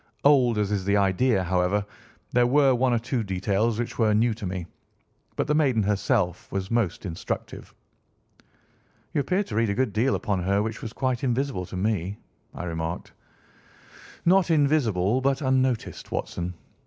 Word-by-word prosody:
Old 130 -5 +5
as 105 -1 0
is 100 -2 0
the 100 +2 +2
idea, 100 +2 +2
however, 90 +3 +1 0.5
there 120 0 +3
were 135 +1 +4
one 125 +1 +2
or 120 - +3
two 120 +2 -2
details 100 +3 0
which 120 +1 -4
were 110 -2 +3
new 115 +2 +3
to 105 -3 -6
me. 90 -2 -4 0.7
But - - 0
the 150 - +1
maiden 135 -8 +2
herself 100 -2 0
was 95 +1 -3
most 110 -6 0
instructive." 85 -3 -5 1.4
"You 145 - +2
appeared 185 +9 0
to 110 - -6
read 115 0 +2
a 100 - 0
good 130 -3 0
deal 120 +5 +2
upon 100 -5 -1
her 100 +3 +1
which 110 0 -4
was 110 - -5
quite 130 +1 -2
invisible 125 -7 -1
to 95 - -6
me," 100 -1 -1 0.3
I - - -7
remarked. 80 0 -4 1.1
"Not 185 +1 +4
invisible 130 - +2
but 135 0 +1
unnoticed, 130 -2 0
Watson. 90 +1 -3
110 Hz, 165 wpm, -25 LUFS, 95-130 Hz, 1.4 s, Old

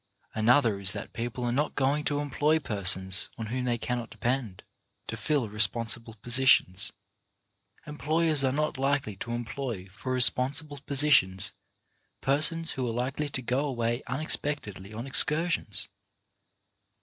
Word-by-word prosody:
Another 115 -1 +3
is 100 0 0
that - - -7
people 120 +1 -4
are 120 - 0
not 145 +5 -1
going 145 +2 +1
to 145 - 0
employ 145 +2 +1
persons 95 - +2
on 115 - -4
whom 130 -1 -2
they 120 -1 0
cannot 120 0 -4
depend, 115 -3 -3 0.4
to - - -5
fill 145 -6 -1
responsible 115 +2 0
positions. 120 -6 +3 0.9
Employers 155 0 +1
are 130 - +2
not 150 0 -2
likely 135 -6 0
to 120 - -7
employ 120 -3 -4
for 120 +6 -6
responsible 135 +4 +3
positions 135 -10 +3 0.7
persons 155 +4 0
who 130 -2 -3
are - - -3
likely 135 +5 -2
to 130 -2 -3
go 125 +4 0
away 120 -3 -2
unexpectedly 130 -8 -2
on 115 +3 -6
excursions. 150 - +2
125 Hz, 135 wpm, -28 LUFS, 115-145 Hz, 0.9 s, Another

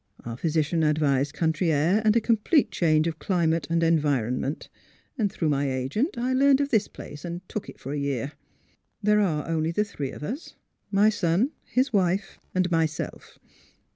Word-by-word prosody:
Our 115 -1 -4
physician 160 +3 0
advised 145 -2 +2
country 160 +1 +1
air 165 +8 +2
and 215 0 +4
a 235 - +4
complete 230 +7 +2
change 155 -2 +2
of 165 -1 -3
climate 165 -4 0
and 165 0 +1
environment. 145 -4 0 0.6
Through 165 -4 -1
my 140 -1 +1
agent 135 - -1
I 250 +2 0
learned 275 +1 +5
of 285 0 0
this 220 -6 +2
place, 145 0 -10
and 175 +1 -6
took 215 - -5
it - - -12
for 135 - -6
a 145 - -2
year. 140 -1 -2 0.7
There 210 +1 +4
are 155 -7 0
only 160 -1 0
the 190 +5 +1
three 145 -9 -5
of - - -9
us 255 - -6 0.2
— - - -47
my 210 +1 +6
son, 200 - +1
his 255 0 0
wife 190 0 0 0.2
and 185 -1 +1
myself. 160 -2 -2
165 Hz, 175 wpm, -26 LUFS, 150-210 Hz, 0.7 s, my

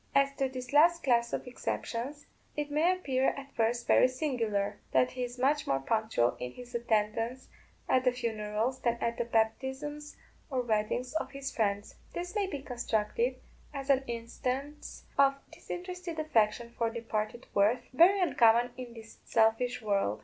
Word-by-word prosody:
As 275 0 +4
to 270 -1 +1
this 255 0 -7
last 335 +3 +5
class 235 -3 +2
of - - -3
exceptions, 255 +2 -4 0.3
it 295 0 -2
may 315 +5 +3
appear 270 -8 0
at 275 0 -9
first 235 +1 0
very - - +6
singular, 225 -7 -1
that 125 -1 +4
he 255 - -6
is 245 0 -5
much 285 +4 +1
more 135 - +2
punctual 215 - +1
in 125 0 -5
his 245 0 -11
attendance 230 +2 -1 0.4
at 255 - +3
the 250 - +4
funerals 225 +1 -2
than 235 -1 +1
at 235 0 -2
the 235 - +1
baptisms 265 +6 -1 0.3
or 260 -3 0
weddings 230 +3 -1
of 315 - -1
his 275 0 -6
friends. 205 -2 0 0.2
This 355 +1 -4
may 410 -3 0
be 285 -7 -5
construed 240 0 -1 0.4
as 275 0 0
an 270 0 +3
instance 255 +5 -4 0.2
of 275 0 +6 0.2
disinterested 360 -2 -6
affection 235 -6 +1
for 230 -1 +1
departed 225 0 -3
worth, 205 +5 +3
very 355 +9 +6
uncommon 245 -6 +4
in 245 -2 -8
this 225 0 -12
selfish 230 +2 +2
world. 195 - +1
245 Hz, 160 wpm, -31 LUFS, 225-275 Hz, 0.4 s, very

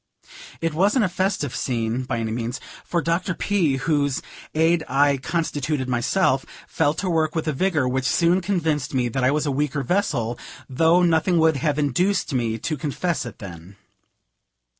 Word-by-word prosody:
It 165 -1 -1
wasn't 205 - +3
a - - -1
festive 180 -7 -1
scene, 120 0 -2
by 125 -2 -2
any 110 -1 -2
means; 120 +2 -3 0.2
for 170 -1 -1
Dr. 170 +2 0
P., 175 -10 +1
whose 140 0 0 0.3
Aid 160 +1 +3
I 140 +1 +3
constituted 145 -2 -2
myself, 130 +3 +1 0.2
fell 155 -1 +1
to 185 - -3
work 160 -2 +1
with 160 -1 -2
a 155 - +1
vigor 160 -3 +1
which 130 +1 -1
soon 170 +8 +3
convinced 160 -8 -1
me 125 -2 +1
that 130 +2 -2
I 130 - +4
was 150 +2 0
a 145 - 0
weaker 140 0 -1
vessel, 125 - -1 0.3
though 165 +6 +3
nothing 170 +1 +3
would 160 -2 +3
have 145 +2 0
induced 155 +5 +1
me 115 -3 0
to 155 +7 -3
confess 150 +1 -2
it 115 - -10
then. 90 -1 -10
150 Hz, 170 wpm, -23 LUFS, 130-170 Hz, 0.3 s, I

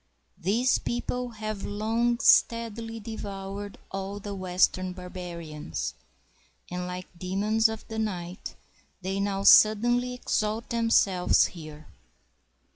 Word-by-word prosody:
These 230 +9 +2
people 250 +1 -3
have 215 -2 -5
long 225 +3 0
steadily 230 -2 +3
devoured 200 -2 -6
all 195 +1 -4
the 205 0 -6
western 185 0 +1
barbarians, 175 - -6 0.8
and 180 0 -3
like 180 0 -5
demons 205 +5 +1
of 220 0 -7
the 220 0 -4
night, 185 -4 -4 0.5
they 190 +1 -2
now 200 -1 -1
suddenly 240 +5 +6
exalt 220 -2 -1
themselves 225 -6 +3
here. 155 -3 -10
205 Hz, 105 wpm, -27 LUFS, 185-225 Hz, 0.8 s, suddenly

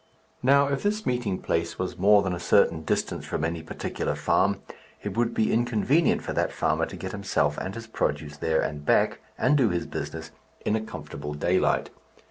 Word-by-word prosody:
Now, 140 +2 +5
if 140 -1 -1
this 210 +1 -1
meeting 120 -7 0
place 85 0 -1
was 95 0 -3
more 100 +2 +6
than 95 -2 -1
a 85 - -3
certain 80 -1 +3
distance 80 - -1
from - - -3
any 85 0 -1
particular 80 - -3
farm, 100 +1 +1 0.4
it - - -4
would 120 0 +1
be 110 - +2
inconvenient 120 +7 +2
for - - -3
that - - 0
farmer - - 0
to - - -8
get - - -5
himself 75 0 0
and 95 - -4
his 115 0 -7
produce 75 -8 -2
there 80 +1 +1
and 75 0 -3
back, - - +2 0.2
and 130 +4 +3
to 130 - +5
do - - +3
his 85 -1 -1
business 80 +3 -6 0.3
in 105 - +2
a 110 - 0
comfortable 75 -8 -7
daylight. 90 +5 +1
95 Hz, 195 wpm, -26 LUFS, 80-120 Hz, 0.4 s, more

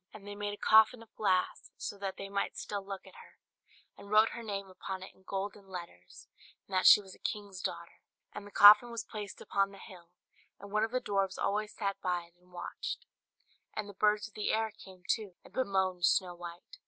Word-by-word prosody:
And 205 -2 -11
they 205 - -5
made 205 0 -3
a - - -21
coffin 220 +3 +5
of 225 - -22
glass 185 -4 0
so - - -5
that 195 -1 -4
they 195 - -6
might 200 0 -2
still 205 -1 -4
look 195 -1 -7
at - - -14
her, - - -15 0.6
and 200 - -13
wrote 215 +1 +6
her 235 - -7
name 200 -3 -4
upon 190 0 -6
it 190 - -11
in - - -25
golden 195 +1 -5
letters, 170 - -10 0.4
and 195 - -13
that 185 0 +4
she - - +10
was 190 -2 -11
a - - -17
king's 200 -3 -4
daughter. 170 0 -5 0.3
And 205 0 -7
the - - -13
coffin 210 +4 +9
was 235 -3 -4
placed 205 -2 -7
upon 195 0 +1
the 200 - -13
hill, 180 -4 -13 0.5
and 200 - -11
one 215 +1 +2
of 225 - +1
the 255 +2 -1
dwarfs 195 -4 0
always 210 +2 -1
sat 200 -2 -2
by 180 -1 0
it 170 0 -20
and 180 0 -25
watched. 175 -1 -5 0.7
And 210 -1 -3
the 205 - -9
birds 210 +2 +2
of 215 - -20
the 210 - -1
air 220 0 0
came 185 -3 -15
too, 205 -5 -1
and - - -17
bemoaned 190 -7 0
Snow 180 -2 +2
White. 175 - -10
200 Hz, 220 wpm, -32 LUFS, 185-210 Hz, 0.7 s, she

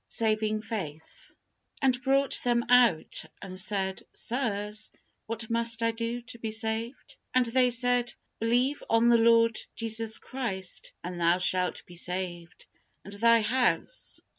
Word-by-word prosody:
SAVING 215 -1 0
FAITH. 175 -9 -7 0.5
And 255 -2 +1
brought 275 0 +2
them 240 -1 +1
out, 245 -10 +3 0.2
and 185 -1 -5
said, 190 -1 0
Sirs, 215 -4 -2 0.4
what 225 0 -5
must 230 0 +1
I 230 - +3
do 230 +1 -4
to 235 0 -11
be 225 - -3
saved? 225 +3 -3 0.2
And 255 -1 +4
they 250 +2 +3
said, 245 0 +3 0.3
Believe 245 +5 +1
on 230 +1 +4
the 235 -1 +5
Lord 230 0 +4 0.2
Jesus 225 -1 -1
Christ, 195 -9 -4
and 175 0 -6
thou 170 +1 +3
shalt 180 0 +1
be 175 - -14
saved, 175 -1 -4 0.4
and 200 - -8
thy 230 +2 +4
house. 255 - 0
230 Hz, 140 wpm, -28 LUFS, 200-240 Hz, 0.5 s, the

